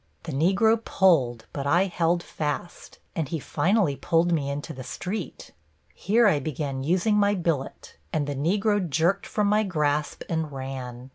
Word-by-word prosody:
The 165 - -5
Negro 195 +10 +3
pulled, 130 - +2
but 140 -1 -3
I 175 +6 +4
held 175 -2 0
fast, 155 +3 -5 0.2
and 160 -6 -2
he 165 - -2
finally 175 - +1
pulled 165 +4 +1
me 145 -4 0
into 145 +3 -4
the 130 -2 -8
street. 185 - -6 0.4
Here 225 +5 +2
I 185 -8 +4
began 140 -3 -3
using 185 +7 +2
my 205 0 +3
billet, 165 -7 -3
and 150 -2 0
the 145 - -3
Negro 200 +9 +1
jerked 170 +7 +1
from 210 - 0
my 210 +1 +3
grasp 150 -6 -1
and 160 -2 -2
ran. 130 -2 -7
165 Hz, 160 wpm, -25 LUFS, 140-195 Hz, 0.4 s, I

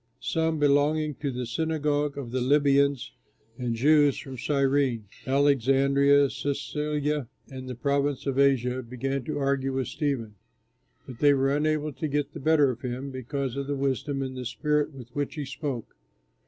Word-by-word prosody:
Some 160 0 0
belonging 150 +1 +2
to 145 - -2
the 125 -1 -3
Synagogue 150 +2 -1
of 130 -4 -6
the 130 0 -1
Libyans, 140 0 +3 0.5
and 120 -2 -1
Jews 145 +3 +4
from 135 -1 -7
Cyrene, 135 -3 +1 0.2
Alexandria, 140 +1 +4
Cilicia, 145 +1 -2 0.2
and 130 -1 -7
the 125 - -5
province 140 +1 0
of 135 -1 -1
Asia 130 -2 +2
began 130 +2 -3
to 155 - -3
argue 135 -1 0
with 130 -1 -2
Stephen; 130 -8 -2 0.7
but 125 -3 -10
they 145 -1 +5
were 135 +1 +2
unable 155 0 0
to 155 - -3
get 145 0 -2
the - - -7
better 145 -2 +4
of 120 0 -9
him 130 +2 -4
because 130 0 -4
of 140 0 -3
the 145 - -1
wisdom 135 +1 -1
and 130 -1 -5
spirit 150 +3 0
with 130 -4 -11
which 145 +5 -3
he 150 -2 -4
spoke. 135 -3 -5
140 Hz, 160 wpm, -27 LUFS, 130-145 Hz, 0.7 s, they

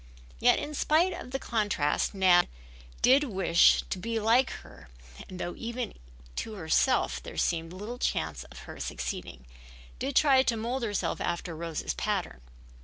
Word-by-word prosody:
Yet - - +5
in 300 - -4
spite 325 +5 +2
of - - -8
the 270 - -2
contrast 205 - 0
Nan 185 -2 +5 0.6
did 270 +3 +6
wish 185 -7 +4
to 185 - -2
be 230 +3 -2
like 230 +4 +3 0.2
her - - -15 0.4
and 185 - -8
though 175 - -3
even 235 0 -4 0.4
to 220 - -3
herself 200 +8 +1
there - - -9
seemed 165 -1 0
little 210 +7 -7
chance 75 - -1
of - - -14
her - - -10
succeeding, 65 -1 -5 0.5
did 270 +1 -3
try 275 -3 +6
to 235 -3 0
mold 240 +4 -2
herself 205 -7 -2
after 170 -1 -3
Rose's 165 -1 -3
pattern. 65 - -2
210 Hz, 155 wpm, -29 LUFS, 170-250 Hz, 0.6 s, did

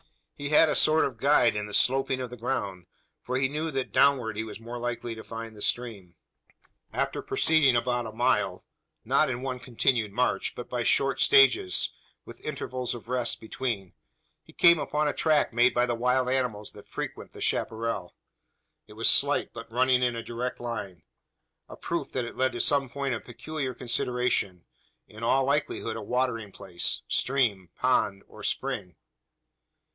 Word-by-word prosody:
He 145 0 -5
had 155 +2 +6
a - - +1
sort 155 +1 +4
of 125 -5 -5
guide 135 -4 +4
in 105 0 -3
the 105 - -9
sloping 135 0 +2
of 125 -2 -5
the - - -6
ground: 100 -7 -3 0.3
for 125 +1 -2
he 130 0 +2
knew 155 +4 -3
that 135 -3 -3
downward 130 -6 +3
he 110 - -2
was 110 -1 -8
more 120 +1 -7
likely 120 -1 -3
to 110 - -9
find 115 -1 -7
the 105 - -11
stream. 105 -9 -3 0.8
After - - -2
proceeding 155 -6 +3
about 120 0 0
a - - -7
mile 105 -5 0 0.4
not - - +3
in 125 0 -3
one 130 -1 -3
continued 120 -2 0
march, 125 +5 0
but - - -7
by - - -2
short - - +2
stages, 395 -3 +5 0.3
with - - -12
intervals 130 -4 -3
of 115 - -11
rest 125 -1 0
between 110 -5 -4 0.5
he - - -18
came 170 -1 +6
upon 150 0 0
a 145 - 0
track 155 -6 +2
made 120 +2 +4
by 120 0 +3
the 120 - -1
wild 125 +2 +1
animals 125 -5 -1
that 105 - -14
frequent - - -6
the - - -11
chapparal. 115 +1 -1 0.7
It 105 - -13
was 115 +2 0
slight, 145 +1 +3
but 115 -1 -9
running 125 +1 +3
in 120 -1 +1
a 115 - -5
direct 120 +2 -4
line 100 -8 -6 0.7
a - - -9
proof 170 -4 -3
that 125 -2 -1
it 120 - -8
led 130 0 +1
to 120 - -1
some 140 -3 +2
point 140 0 -2
of 115 - -4
peculiar 130 +1 -5
consideration 120 -7 -1 0.4
in 110 +1 -12
all 130 +4 +3
likelihood 140 -5 -1
a 110 - -5
watering 115 -2 -1
place 95 -3 -2
stream, 115 -10 +1
pond, 105 -6 +1
or - - -13
spring. 90 -2 -3
125 Hz, 175 wpm, -27 LUFS, 110-130 Hz, 0.8 s, had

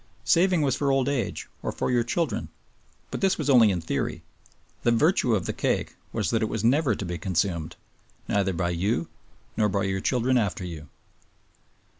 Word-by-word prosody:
Saving 170 +5 +4
was 135 -3 +2
for 140 -1 +1
old 135 -1 +2
age 135 -7 -2
or - - -2
for - - -2
your 120 -1 +3
children; 130 -1 -2 0.6
but - - -4
this 195 -1 +2
was 145 - +1
only 120 -5 +7
in 90 -3 -1
theory, 80 - -3 0.6
the - - +2
virtue 125 - +3
of 95 - -2
the - - -2
cake - - -1 0.2
was 105 -7 -1
that 115 - +1
it 110 - 0
was 110 -1 -3
never 130 -1 +3
to 100 - -5
be 85 -1 -4
consumed, 85 -2 -1 0.5
neither 100 -2 +1
by 85 +1 -1
you 85 0 -1 0.5
nor 105 -2 +2
by 100 0 0
your 95 -1 -1
children 125 +2 +2
after 95 -5 -2
you. 80 -5 -8
110 Hz, 185 wpm, -26 LUFS, 95-130 Hz, 0.6 s, only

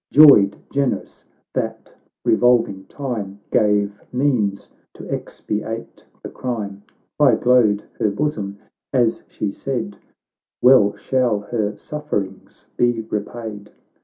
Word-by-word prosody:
Joyed, 120 -10 +7
generous, 140 -2 -2 0.3
that - - -4 0.3
revolving 115 -5 +3
time 105 -8 -5
Gave 105 -1 +2
means 125 -7 0 0.3
to - - -10
expiate 110 +2 -5 0.2
the - - -6
crime. 105 -6 -4 0.4
High - - +6
glowed 120 -5 +3 0.2
her 105 - +2
bosom 100 -4 -2 0.3
as 120 -4 +1
she 105 - -3
said, 110 -4 -4 0.6
"Well 125 -6 +6
shall 105 -2 0
ber 105 -3 -1
sufferings 105 -11 -5
be 120 -2 +2
repaid 105 -1 -5
110 Hz, 105 wpm, -21 LUFS, 100-125 Hz, 0.6 s, Joyed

